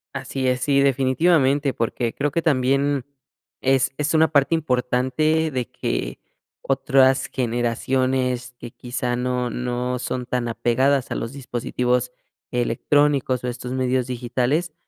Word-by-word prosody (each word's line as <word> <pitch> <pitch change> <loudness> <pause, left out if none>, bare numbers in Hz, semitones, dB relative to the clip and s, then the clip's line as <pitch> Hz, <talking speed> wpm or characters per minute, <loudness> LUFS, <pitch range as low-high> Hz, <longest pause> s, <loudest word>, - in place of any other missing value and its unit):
Así 130 -1 -3
es, 125 0 +1
sí 140 0 +2
definitivamente 140 +1 +2
porque 115 0 -2
creo 145 +1 -1
que 170 - 0
también 140 -2 +1 0.6
es 135 0 +2
es 150 +2 0
una 160 0 +5
parte 145 +2 +3
importante 150 +3 +1
de 125 -3 -3
que - - -3 0.4
otras 135 0 +3
generaciones 125 +1 -1
que 120 -1 -9
quizá 125 0 -3
no 125 0 -1
no 125 0 -2
son 125 0 -3
tan 125 -1 -2
apegadas 130 +4 +1
a - - -1
los 115 - -4
dispositivos 125 -1 -1 0.4
electrónicos 130 +2 +1
o 125 - -2
estos 125 0 -5
medios 130 -1 0
digitales, 130 +6 -1
130 Hz, 130 wpm, -22 LUFS, 125-140 Hz, 0.6 s, una